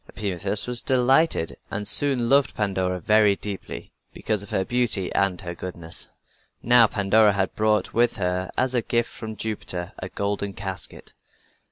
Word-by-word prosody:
Epimetheus 100 Hz, 0 st, -2 dB
was 125 Hz, -1 st, +1 dB
delighted 130 Hz, -, +2 dB
and 105 Hz, 0 st, -2 dB
soon 135 Hz, -5 st, +2 dB
loved 140 Hz, +2 st, +3 dB
Pandora 95 Hz, -3 st, -1 dB
very 105 Hz, +1 st, +4 dB
deeply, 100 Hz, -1 st, -7 dB, 0.2 s
because 105 Hz, -2 st, -2 dB
of 100 Hz, -, -10 dB
her 95 Hz, -, 0 dB
beauty 120 Hz, -6 st, 0 dB
and 95 Hz, -2 st, +1 dB
her 85 Hz, -2 st, -5 dB
goodness. 85 Hz, -2 st, -6 dB, 0.5 s
Now 120 Hz, -1 st, +6 dB
Pandora 105 Hz, +1 st, +3 dB
had 95 Hz, -1 st, -1 dB
brought 110 Hz, 0 st, +1 dB
with 120 Hz, +1 st, +2 dB
her 90 Hz, -1 st, -1 dB
as 130 Hz, 0 st, +1 dB
a 120 Hz, -, +2 dB
gift 120 Hz, +1 st, 0 dB
from 110 Hz, -1 st, -7 dB
Jupiter 95 Hz, -5 st, -4 dB
a 95 Hz, -, -6 dB
golden 100 Hz, 0 st, -2 dB
casket. 95 Hz, -1 st, -6 dB
105 Hz, 155 wpm, -24 LUFS, 95-120 Hz, 0.5 s, Now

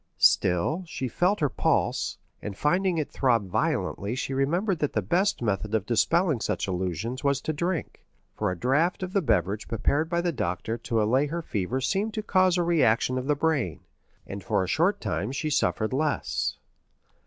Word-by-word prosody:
Still, 90 Hz, -, +3 dB
she 135 Hz, -5 st, -3 dB
felt 180 Hz, -, +1 dB
her 150 Hz, -, +4 dB
pulse, -, -, 0 dB, 0.2 s
and 100 Hz, -2 st, -6 dB
finding 180 Hz, +3 st, +1 dB
it 155 Hz, -, -2 dB
throb 120 Hz, -7 st, +1 dB
violently 100 Hz, +4 st, -1 dB
she 135 Hz, +1 st, -3 dB
remembered 170 Hz, +8 st, 0 dB
that 150 Hz, -, -1 dB
the 110 Hz, -, +1 dB
best 180 Hz, -, +1 dB
method 105 Hz, 0 st, -1 dB
of 105 Hz, -3 st, 0 dB
dispelling 150 Hz, -, +2 dB
such -, -, -1 dB
illusions 95 Hz, -, -3 dB
was 140 Hz, -1 st, +2 dB
to 155 Hz, -, -2 dB
drink, 170 Hz, +3 st, -3 dB, 0.3 s
for 105 Hz, -, -1 dB
a 90 Hz, -, -3 dB
draught 150 Hz, -, +1 dB
of 185 Hz, 0 st, -5 dB
the 200 Hz, -, +3 dB
beverage 110 Hz, -, 0 dB
prepared 145 Hz, +8 st, 0 dB
by 170 Hz, 0 st, +1 dB
the 175 Hz, 0 st, 0 dB
doctor 95 Hz, -, -2 dB
to 115 Hz, -1 st, -1 dB
allay 130 Hz, +7 st, +2 dB
her 170 Hz, +3 st, -4 dB
fever 105 Hz, -, -2 dB
seemed 200 Hz, +10 st, -1 dB
to 215 Hz, -, -2 dB
cause 185 Hz, -3 st, +3 dB
a 175 Hz, -, +2 dB
reaction 130 Hz, -6 st, +2 dB
of 130 Hz, -, -5 dB
the 150 Hz, -, +3 dB
brain, 140 Hz, -, 0 dB, 0.4 s
and 100 Hz, 0 st, -7 dB
for -, -, +1 dB
a -, -, -3 dB
short 170 Hz, -, +2 dB
time 100 Hz, +2 st, -2 dB
she 155 Hz, +3 st, -2 dB
suffered 110 Hz, -4 st, +1 dB
less. 150 Hz, +2 st, -1 dB
135 Hz, 185 wpm, -26 LUFS, 110-170 Hz, 0.4 s, her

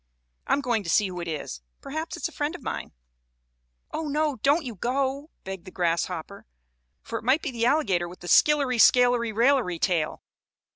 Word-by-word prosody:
I'm 285 Hz, -, +2 dB
going 240 Hz, -5 st, 0 dB
to 175 Hz, -, -7 dB
see 205 Hz, +3 st, +3 dB
who 180 Hz, -1 st, -6 dB
it 170 Hz, -, -5 dB
is. 145 Hz, -, -5 dB, 0.2 s
Perhaps 315 Hz, +4 st, -5 dB
it -, -, -11 dB
is -, -, +2 dB
a -, -, -13 dB
friend 300 Hz, +3 st, -2 dB
of 360 Hz, -, -10 dB
mine." -, -, -4 dB, 1.0 s
"Oh, 320 Hz, -, -3 dB
no! 295 Hz, -1 st, 0 dB
Don't 285 Hz, +6 st, +2 dB
you 240 Hz, -, -5 dB
go!" 270 Hz, -, -2 dB
begged 190 Hz, -2 st, -7 dB
the -, -, -8 dB
grasshopper. 170 Hz, -, -2 dB, 0.6 s
"For 230 Hz, -, -4 dB
it -, -, -15 dB
may 260 Hz, +5 st, +4 dB
be 315 Hz, -3 st, -5 dB
the 235 Hz, -1 st, 0 dB
alligator 195 Hz, -, +1 dB
with 180 Hz, +1 st, -12 dB
the 175 Hz, -, -9 dB
skillery 275 Hz, -, +4 dB
scalery 245 Hz, -1 st, +5 dB
railery 230 Hz, -6 st, +2 dB
tail." 165 Hz, -4 st, 0 dB
240 Hz, 190 wpm, -26 LUFS, 180-280 Hz, 1.0 s, scalery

